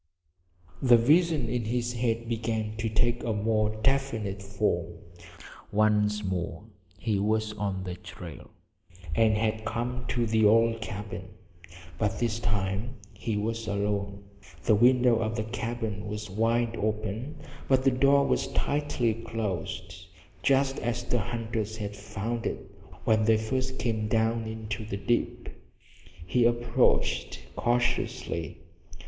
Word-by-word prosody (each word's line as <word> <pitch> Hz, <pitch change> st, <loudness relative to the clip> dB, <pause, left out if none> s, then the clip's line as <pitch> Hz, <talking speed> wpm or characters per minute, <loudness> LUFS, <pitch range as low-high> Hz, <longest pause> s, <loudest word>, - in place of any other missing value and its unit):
The 125 Hz, -3 st, +7 dB
visions 150 Hz, +2 st, +4 dB
in 120 Hz, -2 st, -1 dB
his 120 Hz, +1 st, -1 dB
head 115 Hz, -1 st, -1 dB
began 110 Hz, -2 st, -2 dB
to 110 Hz, 0 st, -1 dB
take 120 Hz, +2 st, +1 dB
a 115 Hz, -, 0 dB
more 110 Hz, 0 st, +1 dB
definite 115 Hz, -7 st, 0 dB
form. 100 Hz, -3 st, -1 dB, 0.8 s
Once 105 Hz, 0 st, +3 dB
more 90 Hz, -2 st, -3 dB, 0.3 s
he 105 Hz, -1 st, 0 dB
was 110 Hz, +1 st, +1 dB
on 100 Hz, -3 st, -2 dB
the 90 Hz, -1 st, -4 dB
trail, 90 Hz, -, -10 dB, 0.6 s
and 110 Hz, +3 st, +4 dB
had 110 Hz, 0 st, 0 dB
come 120 Hz, +3 st, -3 dB
to 120 Hz, -1 st, +1 dB
the 110 Hz, 0 st, +2 dB
old 115 Hz, +2 st, +4 dB
cabin. 105 Hz, -3 st, -6 dB, 0.7 s
But 105 Hz, -2 st, 0 dB
this 115 Hz, -1 st, 0 dB
time 105 Hz, +2 st, -1 dB, 0.2 s
he 110 Hz, -2 st, -2 dB
was 115 Hz, +1 st, -2 dB
alone. 100 Hz, 0 st, -1 dB, 0.4 s
The -, -, +4 dB
window 125 Hz, +2 st, +5 dB
of 110 Hz, -1 st, -1 dB
the 110 Hz, -, -1 dB
cabin 110 Hz, -2 st, -3 dB
was 105 Hz, -1 st, -5 dB
wide 115 Hz, +3 st, +1 dB
open, 110 Hz, +6 st, -2 dB, 0.3 s
but 130 Hz, -1 st, +3 dB
the 135 Hz, -, +5 dB
door 140 Hz, +2 st, +4 dB
was -, -, +1 dB
tightly 140 Hz, -6 st, +1 dB
closed, 95 Hz, -5 st, -4 dB, 0.3 s
just 135 Hz, 0 st, +3 dB
as 120 Hz, +1 st, -2 dB
the 120 Hz, 0 st, 0 dB
hunters 110 Hz, -1 st, -3 dB
had 105 Hz, -1 st, -4 dB
found 110 Hz, +3 st, -3 dB
it -, -, -5 dB, 0.3 s
when 110 Hz, 0 st, +3 dB
they 110 Hz, 0 st, +5 dB
first 130 Hz, +4 st, -2 dB
came 110 Hz, -3 st, -1 dB
down 115 Hz, +1 st, +1 dB
into 110 Hz, -1 st, -4 dB
the 105 Hz, -2 st, -4 dB
dip. 110 Hz, +4 st, -1 dB, 0.8 s
He 115 Hz, +7 st, +3 dB
approached 65 Hz, -, +2 dB
cautiously. 120 Hz, -, -1 dB
110 Hz, 130 wpm, -28 LUFS, 105-120 Hz, 0.8 s, The